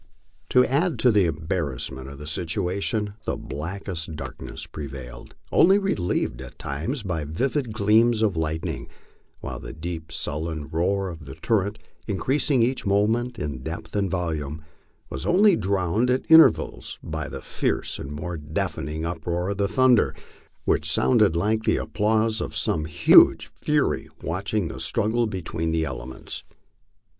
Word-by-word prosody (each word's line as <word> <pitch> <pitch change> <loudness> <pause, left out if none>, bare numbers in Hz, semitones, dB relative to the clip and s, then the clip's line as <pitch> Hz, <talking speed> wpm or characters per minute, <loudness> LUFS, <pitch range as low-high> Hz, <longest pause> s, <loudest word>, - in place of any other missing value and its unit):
To 125 0 +5
add 155 +6 +1
to 125 - +4
the 105 -4 +4
embarrassment 75 -5 -3
of 70 - -10
the 75 - -9
situation, 90 +6 -1
the - - -1
blackest 80 0 -5
darkness 70 -3 -7
prevailed, 65 -4 -8 0.2
only 190 +3 +6
relieved 95 - -1
at - - -10
times 105 - -3
by 90 -5 -2
vivid 125 - -1
gleams 110 +2 +3
of 105 -5 +2
lightning, 80 0 -2 0.5
while - - -5
the - - -8
deep 80 0 -6
sullen 80 0 -3
roar 95 +4 0
of 80 -3 -9
the 65 - -9
torrent, 105 -1 0 0.3
increasing 130 +5 +2
each 130 +2 0
moment 110 +5 +1
in 75 - -4
depth 80 +4 -6
and 100 -2 +1
volume, 80 -4 -3 0.5
was 65 - -4
only 200 +1 +5
drowned 100 - +1
at 125 +1 +1
intervals 160 0 +5
by 80 -1 -4
the - - -6
fierce - - -2
and 70 - -6
more 80 +4 -4
deafening 75 0 -3
uproar 85 +2 -2
of 100 - -3
the 100 0 +1
thunder, 130 +2 +4 0.5
which - - +2
sounded 105 -9 +4
like 110 +6 +1
the - - +2
applause 110 +1 +1
of - - -4
some 75 - 0
huge 80 - +6
fury - - 0
watching 95 +3 -1
this 80 - -3
struggle 115 +5 +2
between 85 -4 -3
the 80 -1 +1
elements. 65 -2 -6
90 Hz, 145 wpm, -25 LUFS, 80-110 Hz, 0.5 s, only